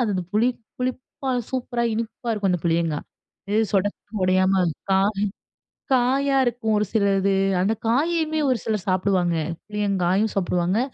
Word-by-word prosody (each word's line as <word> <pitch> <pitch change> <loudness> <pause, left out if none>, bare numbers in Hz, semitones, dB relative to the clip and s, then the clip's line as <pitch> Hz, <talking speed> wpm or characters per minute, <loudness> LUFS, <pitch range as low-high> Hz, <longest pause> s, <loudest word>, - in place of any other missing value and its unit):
அது 240 - +1
அந்த 185 - -1
புளி 225 +4 +3 0.3
புளிப்பா 255 +2 -3 0.2
சூப்பரா 245 -2 -2
இனிப்பா 230 +2 -4
இருக்கும் 200 -3 0
அந்த 180 - -1
புளியங்காய். 165 -2 0 0.5
இது 215 +2 +3
சொடக்குன்னு 205 +1 -1
உடையாம 185 0 +3 0.3
காய் 200 +1 +2 0.7
காயா 270 +2 +2
இருக்கும் 230 -2 0
ஒரு 210 - +1
சிலது. 200 -2 +2 0.3
அந்த 205 +4 +2
காயையுமே 315 +5 +1
ஒரு 250 - +2
சிலர் 215 -3 -2
சாப்புடுவாங்க. 185 -2 +1 0.3
புளியங்காயும் 200 0 +1
சாப்புடுவாங்க, 180 +2 +1
210 Hz, 130 wpm, -23 LUFS, 190-240 Hz, 0.7 s, புளி